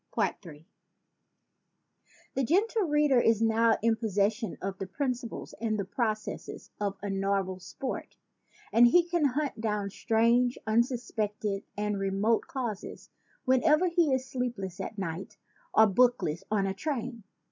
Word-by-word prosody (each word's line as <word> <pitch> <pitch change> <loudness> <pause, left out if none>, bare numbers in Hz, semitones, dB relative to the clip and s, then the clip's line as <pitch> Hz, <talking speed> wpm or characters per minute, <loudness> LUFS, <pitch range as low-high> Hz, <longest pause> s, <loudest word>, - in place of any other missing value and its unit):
Ill 165 -6 -1 1.8
THE 270 - 0
Gentle 400 - +2
Reader 295 -3 +4
is 225 -2 +3
now 225 0 +3
in 230 0 +4
possession 215 -1 -1
of 195 0 -5
the 195 - -4
principles 250 +2 -4
and 220 -2 0
the 200 - -2
processes 215 +1 -3
of 200 -1 -2
a 205 - -2
novel 195 -1 -1
sport; 195 +8 -6 0.5
and 240 +1 +7
he 345 +7 +4
can 345 -3 +1
hunt 280 -3 -1
down 210 -3 -1
strange, 235 +4 +2
unsuspected 220 -3 -1
and 210 -1 -1
remote 195 +4 +1
causes 235 -6 -5 0.3
whenever 305 +7 +4
he 335 -4 +2
is 260 0 0
sleepless 240 -8 -4
at 220 - -5
night 185 -1 -5 0.3
or 220 - +6
bookless 215 -6 +2
on 205 -2 +1
a 195 - -1
train. 245 -1 -4
225 Hz, 135 wpm, -29 LUFS, 200-255 Hz, 1.8 s, and